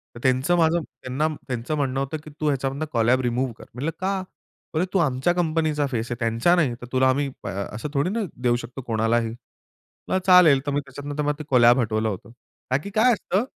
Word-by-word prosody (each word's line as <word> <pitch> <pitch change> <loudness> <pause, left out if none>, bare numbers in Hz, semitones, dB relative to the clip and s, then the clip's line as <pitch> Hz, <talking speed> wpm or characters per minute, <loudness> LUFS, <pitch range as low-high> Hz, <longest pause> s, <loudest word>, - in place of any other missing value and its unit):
तर - - -8
त्यांचं 130 +6 +2
माझं 165 +1 +3
त्यांना 130 +3 -3 0.2
त्यांचं 125 +3 -3
म्हणणं 135 -2 -1
होतं 140 +3 -2
की 155 - -10
"तू 155 - 0
ह्याच्यामधनं 140 +1 -1
कोलॅब 120 +1 +3
रिमूव्ह 125 0 -1
कर." - - -12
म्हटलं, 140 +7 -2
"का?" 195 +1 0
बोलले, 165 -3 -8
"अरे! 185 - -6
तू 195 - +3
आमच्या 135 +1 +1
कंपनीचा 155 -4 0
फेस 120 0 -2
आहे, 120 - 0
त्यांचा 115 +9 +2
नाही, 150 -9 +2
तर - - -6
तुला 130 0 +3
आ - - +4
आम्ही 140 +2 +1 0.2
ब - - -6
अ, - - -2 0.3
असं 115 +7 -5
थोडी 145 +6 +1
ना 230 - -2 0.2
देऊ 120 -1 +3
शकतो 125 +3 -8
कोणालाही." 115 +1 +1 0.8
म्हटलं 185 - +1
"चालेल!" 180 -7 +7
तर 145 - -1
मी 145 - +1
त्याच्यात 140 +1 -9
नंतर 150 +1 -2
मला 150 - +1
ते 155 - -5
कोलॅब 120 0 +6
हटवलं 110 -1 0
होतं. 105 +3 -7 0.4
का 130 - +4
की - - -6
काय 245 +3 +5
असतं 205 0 0
135 Hz, 225 wpm, -24 LUFS, 125-155 Hz, 0.8 s, चालेल